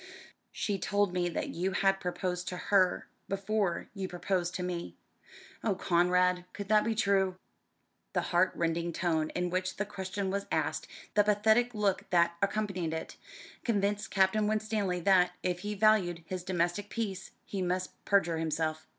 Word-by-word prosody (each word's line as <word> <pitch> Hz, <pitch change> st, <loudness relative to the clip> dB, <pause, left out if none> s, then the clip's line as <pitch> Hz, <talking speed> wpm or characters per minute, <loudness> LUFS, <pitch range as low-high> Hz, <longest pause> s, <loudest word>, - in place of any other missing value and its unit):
"She 200 Hz, -2 st, -2 dB
told 200 Hz, -1 st, +1 dB
me 175 Hz, -1 st, +1 dB
that 170 Hz, -, -3 dB
you 185 Hz, +3 st, -2 dB
had 195 Hz, 0 st, +2 dB
proposed 180 Hz, -1 st, -3 dB
to 180 Hz, -, -3 dB
her 185 Hz, -1 st, +2 dB, 0.2 s
before 195 Hz, -2 st, -1 dB
you 195 Hz, -2 st, -3 dB
proposed 180 Hz, -1 st, -1 dB
to 180 Hz, -, -2 dB
me. 175 Hz, -1 st, -4 dB, 0.7 s
Oh, 205 Hz, -4 st, +1 dB
Conrad, 180 Hz, 0 st, +2 dB
could 200 Hz, -1 st, -6 dB
that 215 Hz, -1 st, +5 dB
be 225 Hz, 0 st, 0 dB
true?" 195 Hz, -3 st, +2 dB, 0.8 s
The -, -, +2 dB
heart 180 Hz, +2 st, +4 dB
rending 170 Hz, 0 st, -1 dB
tone 160 Hz, -3 st, 0 dB
in 180 Hz, 0 st, -1 dB
which 185 Hz, 0 st, -1 dB
the 205 Hz, -, -1 dB
question 190 Hz, -1 st, -3 dB
was 200 Hz, 0 st, -2 dB
asked, -, -, -1 dB, 0.3 s
the 205 Hz, -, +5 dB
pathetic 220 Hz, +3 st, +3 dB
look 205 Hz, -2 st, 0 dB
that 170 Hz, -1 st, +3 dB
accompanied 195 Hz, -5 st, -1 dB
it, 160 Hz, -, -6 dB, 0.5 s
convinced 205 Hz, -2 st, 0 dB
Captain 200 Hz, +2 st, +3 dB
Winstanley 210 Hz, -4 st, 0 dB
that, 180 Hz, -1 st, +4 dB
if 180 Hz, -1 st, 0 dB
he 210 Hz, +2 st, -4 dB
valued 195 Hz, -5 st, +3 dB
his 185 Hz, 0 st, -5 dB
domestic 180 Hz, +2 st, -1 dB
peace, 195 Hz, -5 st, -3 dB, 0.2 s
he 195 Hz, -, -4 dB
must 185 Hz, 0 st, -2 dB
perjure 175 Hz, -5 st, +2 dB
himself. 155 Hz, 0 st, -2 dB
185 Hz, 160 wpm, -31 LUFS, 175-205 Hz, 0.8 s, that